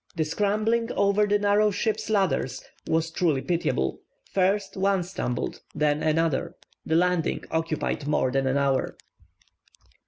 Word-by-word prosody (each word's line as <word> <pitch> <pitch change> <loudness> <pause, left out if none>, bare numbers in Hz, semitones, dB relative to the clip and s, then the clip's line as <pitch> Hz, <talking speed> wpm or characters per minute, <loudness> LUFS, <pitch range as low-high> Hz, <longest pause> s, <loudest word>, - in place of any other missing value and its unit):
The 160 -2 0
scrambling 215 +7 0
over 200 +1 +2
the 205 0 +3
narrow 205 +1 +3
ship's 215 +2 -2
ladders 150 - 0 0.2
was 165 0 0
truly 160 -6 +1
pitiable; 175 -1 -1 0.3
first 195 +1 +1
one 195 -1 +1
stumbled, 170 -9 -4
and - - -7
then 150 0 +2
another. 160 -1 0 0.3
The 160 - 0
landing 180 -1 +1
occupied 160 -2 -2
more 130 -3 +1
than 135 0 +1
an 130 +1 +1
hour. 135 -2 0
175 Hz, 135 wpm, -26 LUFS, 150-205 Hz, 0.3 s, the